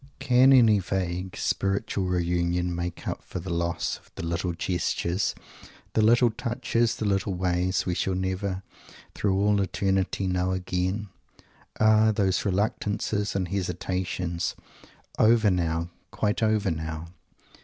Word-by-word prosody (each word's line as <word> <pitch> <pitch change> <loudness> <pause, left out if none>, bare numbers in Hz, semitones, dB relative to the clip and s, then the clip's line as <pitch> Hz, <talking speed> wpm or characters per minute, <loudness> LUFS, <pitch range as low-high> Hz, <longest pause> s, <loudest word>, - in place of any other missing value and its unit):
Can 130 0 +5
any 115 -6 +6
vague, 90 0 -3
spiritual 100 0 -1
reunion 90 0 0
make 85 0 -4
up - - -3
for - - -8
the 90 +1 -5
loss 85 0 -1
of - - -25
the - - -5
little 85 +1 -1
gestures, 85 +2 -1 0.6
the 110 - +3
little 120 +2 +5
touches, 120 0 0
the 110 - -3
little 95 -1 0
ways, 90 +1 0
we 90 - 0
shall 95 +2 -1
never 95 +1 -2 0.5
through 95 -2 0
all 100 0 +3
eternity 95 +1 0
know 90 0 0
again? 95 +3 -2 0.7
Ah! 110 0 +5
those 95 -3 +1
reluctances 105 +1 -1
and 95 -3 -1
hesitations, 90 -2 -2 0.6
over 110 -2 +5
now, 85 -1 -1 0.2
quite 105 +2 -1
over 110 -3 +2
now! 80 0 -5
95 Hz, 130 wpm, -26 LUFS, 90-105 Hz, 0.7 s, any